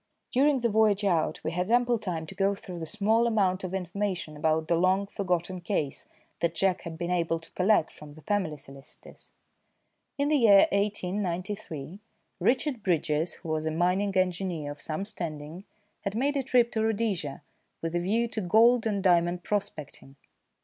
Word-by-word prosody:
During 275 0 +3
the 235 - +2
voyage 210 -1 +3
out 170 -5 0
we - - -2
had 180 +3 -2
ample 240 0 +3
time 170 -6 -4
to - - -10
go 195 0 +1
through 180 -3 -8
the 160 - -5
small 220 +5 +2
amount 195 -5 +1
of 185 - -4
information 185 -3 -3
about 155 +1 0
the 170 - +2
long 185 +3 +2
forgotten 180 -2 -2
case 160 -6 -2 0.3
that 170 -1 0
Jack 190 +1 +1
had 165 -2 -7
been 175 +1 -3
able 165 -2 +1
to 165 - -18
collect 190 -2 +2
from 150 -1 -12
the 155 - -15
family 190 -8 -1
solicitors. 135 0 -12 0.9
In 285 0 +1
the 305 - +4
year 205 -6 +7
1893, 190 -4 -3 0.4
Richard 255 -1 +1
Bridges, 160 -3 0
who 165 - -10
was 155 0 -1
a - - 0
mining 185 +4 +1
engineer 180 -5 -1
of 145 - -10
some 160 +5 -3
standing, 165 -3 -5 0.3
had 200 0 -4
made 280 +5 +1
a 275 - +1
trip 245 -2 +2
to 220 - -1
Rhodesia 205 -10 -1 0.4
with 165 0 -2
a 175 - +1
view 220 +7 +1
to 220 - -3
gold 225 +5 +4
and 200 -3 -1
diamond 175 -1 +3
prospecting. 160 -10 -4
185 Hz, 175 wpm, -28 LUFS, 165-210 Hz, 0.9 s, year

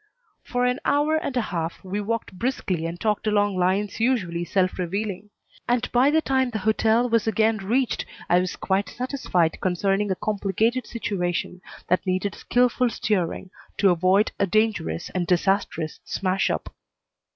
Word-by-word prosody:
For 245 0 -1
an 250 +2 +1
hour 295 +2 +2
and 275 -4 -3
a - - +3
half 165 -1 -3
we 195 +2 -3
walked 230 -1 -3
briskly 185 -6 -2
and 170 +1 -6
talked 215 -1 0
along 205 -2 +2
lines 190 +4 0
usually 195 -9 0
self 185 +1 0
revealing; 195 +2 -3 0.4
and 245 0 +2
by 250 +3 +4
the 315 +1 +2
time 260 -1 +1
the 225 - -3
hotel 220 +2 +3
was 230 -2 +1
again 220 +1 +2
reached 230 +6 0 0.2
I 175 - +4
was 180 0 -2
quite 195 +2 -1
satisfied 245 - -1
concerning 195 +3 +1
a 190 - +1
complicated 215 +5 0
situation 180 -5 -3 0.3
that 180 +2 +1
needed 185 +2 0
skilful 250 0 +2
steering 190 -4 -2 0.3
to 195 -2 +4
avoid 185 +4 +3
a 200 - +2
dangerous 215 -4 0
and 180 -2 -2
disastrous 180 -3 0
smash 190 0 0
up. - - -3
205 Hz, 155 wpm, -24 LUFS, 185-235 Hz, 0.4 s, by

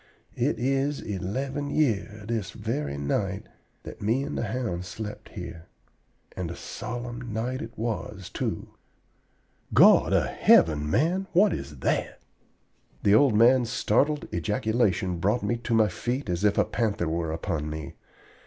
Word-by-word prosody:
It - - 0
is 135 +3 0
eleven 130 +9 -3
year 105 -7 0
this 110 -5 -2
very 70 -1 -3
night 95 +8 -1 0.4
that - - -10
me 115 +6 +1
and - - -4
the - - -1
hound 105 -6 -2
slept 105 +4 -7
here, 85 0 -8 0.7
and 90 -3 -3
a 85 - -6
solemn 120 0 -6
night 120 +4 -2
it 115 - -8
was, 105 -4 -4
too.... - - -4 1.1
God - - +7
of - - +3
heaven, 75 -2 +4
man, 175 - +1
what 195 +2 +5
is 70 +1 -6
that?" - - -1 0.8
The 100 - +5
old 120 0 +5
man's 120 +2 +5
startled 140 +6 +1
ejaculation 95 -1 0
brought 105 +7 +1
me 120 - 0
to 115 0 -1
my 110 -1 +5
feet 120 +6 -3
as 90 +3 -2
if 105 -1 +3
a - - +4
panther 105 -5 -1
were 80 0 -1
upon 80 -2 -3
me. 75 -2 -6
110 Hz, 145 wpm, -27 LUFS, 90-125 Hz, 1.1 s, God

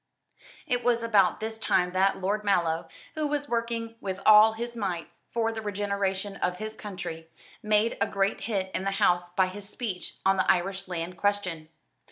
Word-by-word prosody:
It 245 0 0
was 235 -1 +2
about 210 -5 +3
this 220 0 -4
time 180 -4 +2
that 190 +1 +2
Lord 205 +3 -1
Mallow, 170 -5 +1 0.3
who 310 -1 -1
was 290 -1 -2
working 230 -2 -2
with 190 -1 -3
all 215 +1 +8
his 235 +1 -5
might 190 -7 -3 0.2
for 225 -1 0
the 225 0 -5
regeneration 200 -1 -2
of 180 0 -1
his 215 +2 -5
country, 175 -6 -7 0.3
made 215 +2 +2
a - - +3
great 195 +1 0
hit 195 -4 -2
in - - -1
the 195 - 0
House 175 -4 +3
by 185 +1 +2
his 195 +2 -7
speech 210 -6 -5
on 195 0 +4
the 185 - +4
Irish 190 +2 -1
land 175 0 -4
question. 185 -6 -1
200 Hz, 180 wpm, -28 LUFS, 185-220 Hz, 0.3 s, all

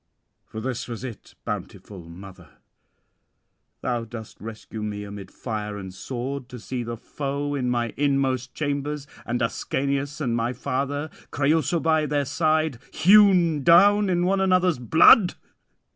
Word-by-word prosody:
For 110 - -7
this 125 +1 -4
was 120 -1 -6
it, 120 -5 -9
bountiful 90 -5 -7
mother, 95 +2 -13 1.2
thou 120 -2 -1
dost 110 -1 -10
rescue 110 0 -8
me 105 -1 -4
amid 100 -1 -8
fire 105 -3 -5
and 95 -2 -8
sword, 125 +5 -5
to 125 - -8
see 125 +2 -4
the 115 0 -5
foe 140 +3 -4
in 130 -3 -1
my 120 -2 -1
inmost 135 -2 0
chambers, 145 -1 -2 0.2
and 120 0 -1
Ascanius 140 +4 -2
and 125 -6 -1
my 120 +1 -1
father, 140 +3 -3 0.2
Creüsa 160 +3 +1
by 155 -1 +2
their 145 -1 0
side, 155 -2 +1
hewn 180 -5 +5
down 200 +6 +6
in 175 -1 +1
one 195 +1 +2
another's 185 -5 +2
blood? 165 - +6
135 Hz, 140 wpm, -24 LUFS, 115-155 Hz, 1.2 s, down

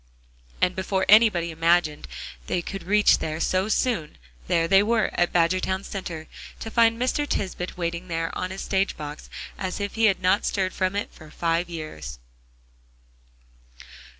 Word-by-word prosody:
And 180 0 +2
before 190 0 0
anybody 205 -6 +5
imagined 165 -1 +1 0.4
they 175 - -1
could 195 +2 -5
reach 210 +2 +4
there 155 0 -3
so 185 +4 +1
soon, 220 -10 0 0.3
there 165 0 +2
they 195 +3 +6
were 220 0 +1
at 175 - +1
Badgertown 185 +2 +1
Center, 170 -6 -6 0.3
to 225 - -6
find 230 0 +4
Mr. 260 +4 0
Tisbett 185 -6 -3
waiting 170 +1 -3
there 165 -1 -2
on 185 - -2
his 190 +1 -6
stage 195 0 0
box 150 0 -8 0.3
as 185 0 -3
if 200 0 -3
he 225 0 +2
had 195 -3 +3
not 185 +2 +2
stirred 190 -2 -1
from 185 0 -1
it 205 - -3
for 155 -2 -14
five 170 +2 -1
years. 80 - -7
185 Hz, 155 wpm, -25 LUFS, 165-200 Hz, 0.4 s, they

